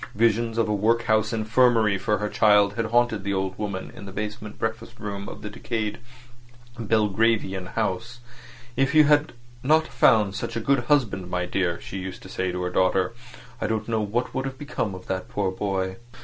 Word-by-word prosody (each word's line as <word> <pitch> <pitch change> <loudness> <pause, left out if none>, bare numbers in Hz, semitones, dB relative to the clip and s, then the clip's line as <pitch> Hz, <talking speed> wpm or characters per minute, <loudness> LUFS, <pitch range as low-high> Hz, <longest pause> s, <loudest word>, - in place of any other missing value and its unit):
Visions 115 +1 +2
of 115 - +2
a 105 - 0
workhouse 110 +1 +2
infirmary 115 -1 +3
for 105 +2 0
her 105 +1 -2
child 105 -1 +4
had 115 +1 -1
haunted 115 -2 +2
the 100 0 -1
old 95 0 -2
woman 100 -3 -4
in 100 - -9
the - - -7
basement 105 +1 -5
breakfast 110 +1 -4
room 100 -2 -5
of - - -10
the 105 - -4
decayed 110 +1 -3 0.8
Belgravian 105 -3 +1
house. 115 +3 -2 0.6
"If 135 +4 +1
you 155 - +8
had 145 -1 +3 0.3
not 155 +4 +4
found 110 -5 +4
such - - -4
a - - 0
good 120 +1 +1
husband, 115 -10 +1
my 90 0 -1
dear," 90 -2 -1
she 95 - -6
used 95 -1 -7
to - - -11
say 95 0 -2
to 90 0 -3
her 90 - -2
daughter, 95 +3 +2 0.5
"I - - 0
don't 110 -1 -2
know 110 -1 0
what 110 +4 -2
would 130 0 -2
have 135 0 -5
become 125 -9 -3
of 90 - -10
that 95 -1 -3
poor 100 -2 -1
boy." 95 -1 -2
105 Hz, 190 wpm, -25 LUFS, 95-115 Hz, 0.8 s, you